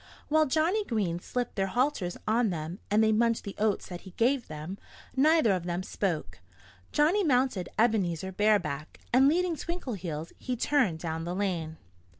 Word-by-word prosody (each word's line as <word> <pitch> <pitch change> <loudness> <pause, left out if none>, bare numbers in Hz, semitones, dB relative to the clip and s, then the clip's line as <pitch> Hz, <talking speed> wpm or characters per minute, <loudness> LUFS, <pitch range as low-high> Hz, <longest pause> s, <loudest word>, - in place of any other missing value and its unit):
While 310 0 +4
Johnnie 325 +10 +2
Green 200 - -1
slipped 245 +6 -3
their 195 -1 0
halters 240 -5 0
on 225 +1 +3
them, 165 +2 -4
and 215 +2 +4
they 220 - +4
munched 230 +1 +2
the 200 - -6
oats 210 -1 +1
that 175 -1 -7
he 190 - -13
gave 250 +2 +2
them, 155 +5 -7 0.4
neither 305 -3 +4
of 180 -3 -1
them 175 +1 -2
spoke. 160 - -3 0.5
Johnnie 335 +8 +3
mounted 250 - +1
Ebenezer 190 -6 +1
bareback; 200 -7 0
and 265 +2 +6
leading 345 +3 +2
Twinkleheels, 195 - -5
he 255 - -3
turned 240 - +2
down 160 0 -4
the 175 +2 -3
lane. 170 -5 -2
210 Hz, 160 wpm, -29 LUFS, 175-260 Hz, 0.5 s, and